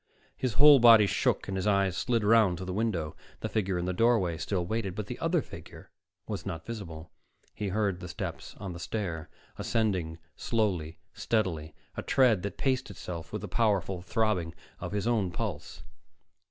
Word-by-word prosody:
His 130 -4 -2
whole 145 +3 +9
body 115 -3 +8
shook - - 0
and 95 - -3
his 95 +2 -1
eyes 100 -3 +2
slid 115 -3 0
around 105 -4 +4
to 95 - -6
the 90 - -4
window. 95 -8 -1 0.3
The - - -2
figure 95 -4 0
in 90 - -2
the 90 - -1
doorway 105 -5 +3
still 90 -4 -1
waited 100 -1 -2
but 105 - -3
the - - -7
other - - +1
figure - - -12 0.4
was - - -4
not 80 0 -5
visible. 85 -8 -7 0.4
He 105 - -3
heard 100 -2 0
the 90 - -7
steps - - -6
on 95 -3 -6
the 85 - -8
stair, 85 -5 -4 0.3
ascending 95 -8 0 0.2
slowly, 90 -9 -1 0.2
steadily, 85 -9 -1 0.2
a - - -3
tread 120 -8 +3
that 100 - -5
paced 130 -4 0
itself 85 -4 -7
with 105 -1 -4
the - - -4
powerful 95 -3 +1
throbbing 95 -4 0 0.2
of - - -5
his 105 0 -1
own 110 -6 +1
pulse. 85 - -5
100 Hz, 180 wpm, -29 LUFS, 90-110 Hz, 0.4 s, whole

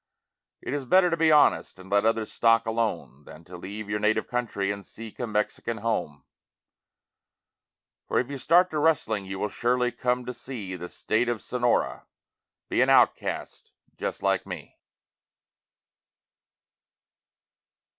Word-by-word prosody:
It - - -4
is 145 -2 -3
better 180 +6 +4
to - - +2
be 165 -1 +3
honest 95 - +4
and 95 +1 -13
let 100 +1 +3
other's 115 -1 0
stock 115 0 +3
alone 110 -10 -2
Than 80 - -13
to 90 +2 -12
leave 100 +4 -7
your 105 0 -1
native 110 +1 +1
country 115 -5 -2
and 100 0 -6
seek 110 +1 -11
a 120 - -2
Mexican 110 +2 -2
home. 100 -11 -2 1.8
For - - 0
if 125 +3 0
you 140 - -5
start 180 +6 +4
to 155 - -1
rustling 120 -10 +1
you 95 0 -5
will 105 - -1
surely 125 +3 0
come 125 +1 -1
to 125 - -4
see 110 -9 -7
The 90 0 -7
State 120 +3 0
of 120 -2 -1
Sonora, 120 +2 0 0.6
be - - +1
an - - +3
outcast - - +1 0.2
just - - -4
like - - +1
me. - - -8
115 Hz, 145 wpm, -26 LUFS, 100-125 Hz, 1.8 s, better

